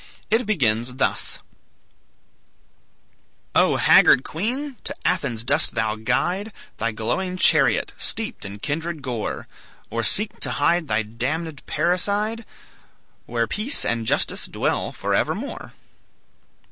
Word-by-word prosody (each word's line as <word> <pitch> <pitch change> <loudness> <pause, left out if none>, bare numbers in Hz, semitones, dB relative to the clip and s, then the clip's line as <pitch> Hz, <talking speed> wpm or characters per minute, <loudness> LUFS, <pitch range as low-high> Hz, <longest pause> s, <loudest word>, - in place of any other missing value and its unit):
It 225 +1 +2
begins 125 - +1
thus: 135 - 0 2.2
"O - - +4
haggard 130 - +6
queen! 250 - -3
to - - -4
Athens 140 -11 0
dost 140 +4 +2
thou 110 -2 0
guide 175 - -1 0.3
Thy 115 +1 -1
glowing 180 - -2
chariot, - - +4
steeped 225 -1 -3
in 100 +1 -7
kindred 160 +5 -3
gore; 120 -5 -4 0.4
Or 115 +1 -1
seek 210 - +1
to - - +2
hide 170 -2 +2
thy 110 -1 +1
damned 135 +8 -4
parricide 205 +7 0 0.8
Where 115 -1 0
peace 215 - +1
and 115 -1 -1
justice - - +1
dwell - - -1
for - - -3
evermore?" - - -2
150 Hz, 115 wpm, -23 LUFS, -, 2.2 s, haggard